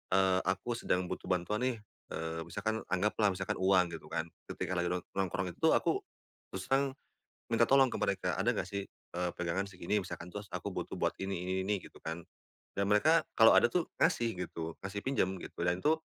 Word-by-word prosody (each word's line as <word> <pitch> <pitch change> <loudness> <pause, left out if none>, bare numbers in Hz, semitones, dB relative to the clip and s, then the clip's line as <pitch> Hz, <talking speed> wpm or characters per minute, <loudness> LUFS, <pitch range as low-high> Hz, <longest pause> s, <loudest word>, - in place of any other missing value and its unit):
eee, 95 -1 +4
aku 95 +5 0
sedang 90 - +1
butuh - - -5
bantuan 90 +4 0
nih, 125 -3 -1 0.4
eee, 80 0 -3
misalkan 110 +2 -2
anggaplah 105 +3 +2
misalkan 95 +1 -2
uang, 95 -2 +4
gitu 85 - -8
kan, 80 0 -3 0.2
ketika - - -4
lagi 85 - +1
nong 90 0 -1
nongkrong 95 -1 -1
itu - - +3
aku - - +2 0.5
terus 95 0 -4
terang 135 0 +2 0.6
minta 115 0 +4
tolong 135 0 +6
ke - - -3
mereka 100 -1 0
ada - - +2
enggak 90 - -2
sih, 100 -1 -3
eee, 90 0 -5
pegangan 90 +3 -1
segini 95 +1 -1
misalkan 90 -2 -6
terus 105 +2 -6
aku - - -3
butuh - - -4
buat - - +1
ini 95 0 -2
ini 95 - 0
ini, 105 - +2
gitu - - -13
kan, 80 +1 -5 0.6
dan 100 - +2
mereka 155 +11 +5 0.2
kalau 115 -1 +9
ada - - +6
tuh 180 -2 +1
ngasih 120 - +2
gitu, 80 0 -5
ngasih 100 +2 -3
pinjam 115 -8 +1
gitu - - -10
dan 90 +1 +1
itu 155 +1 +4
95 Hz, 195 wpm, -33 LUFS, 90-110 Hz, 0.6 s, kalau